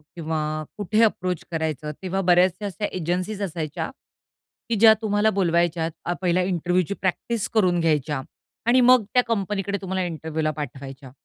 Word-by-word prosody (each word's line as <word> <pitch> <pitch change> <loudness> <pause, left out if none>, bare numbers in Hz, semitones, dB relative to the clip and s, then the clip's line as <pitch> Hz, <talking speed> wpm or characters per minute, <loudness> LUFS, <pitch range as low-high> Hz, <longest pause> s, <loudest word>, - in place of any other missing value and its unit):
किंवा 160 -2 -2 0.4
कुठे 210 +2 +1
अप्रोच 185 -5 0
करायचं. 155 -2 -2
तेव्हा 190 0 -1
बऱ्याचशा 180 +2 +3
अशा 200 +1 -3
एजन्सीज 185 +4 -2
असायच्या 160 -5 -3 0.8
की 230 - +1
ज्या 220 +1 +8
तुम्हाला 210 0 +2
बोलवायच्या. 170 -3 0
पहिले 180 0 +2
इंटरव्ह्यूची 180 0 0
प्रॅक्टिस 210 +4 -1
करून 185 -6 +3
घ्यायच्या 150 -4 0 0.5
आणि 250 +2 +5
मग 250 -1 +6
त्या 250 - +5
कंपनीकडे 200 -2 -1
तुम्हाला 190 -1 -2
इंटरव्ह्यूला 160 -2 -2
पाठवायच्या, 135 -3 -8
180 Hz, 135 wpm, -24 LUFS, 160-205 Hz, 0.8 s, ज्या